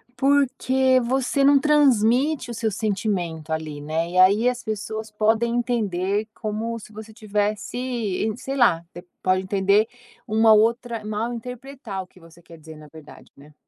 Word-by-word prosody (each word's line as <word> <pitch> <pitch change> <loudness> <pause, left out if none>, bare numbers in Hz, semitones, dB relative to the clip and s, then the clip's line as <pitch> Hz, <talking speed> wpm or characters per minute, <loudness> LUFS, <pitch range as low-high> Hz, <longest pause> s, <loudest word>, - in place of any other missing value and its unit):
Porque 265 -1 +2
você 260 +3 0
não 280 0 +6
transmite 275 -1 +2
o - - -4
seu 225 -1 -2
sentimento 190 -6 -3
ali, 155 -2 -4
né, 160 +3 -2
e 180 - -3
aí 200 +6 +5
as 250 0 -5
pessoas 220 0 -5
podem 220 +2 +1
entender 210 -4 -1
como 225 +2 -4
se 215 - -14
você 220 +1 -10
tivesse 210 0 -2
e 225 -4 -2
sei 270 +2 -5
lá, 205 -11 +3
de 175 - -9 0.2
pode 185 0 +1
entender 200 +2 +2 0.4
uma 220 0 +5
outra 230 +1 +1
mal 215 +3 -3
interpretar 250 -3 -7
o - - -18
que 185 - -21
você 165 0 -18
quer 165 0 -15
dizer 160 0 -12
na 155 0 -13
verdade, 155 0 -15
né. 145 +2 -17
220 Hz, 160 wpm, -23 LUFS, 185-245 Hz, 0.4 s, não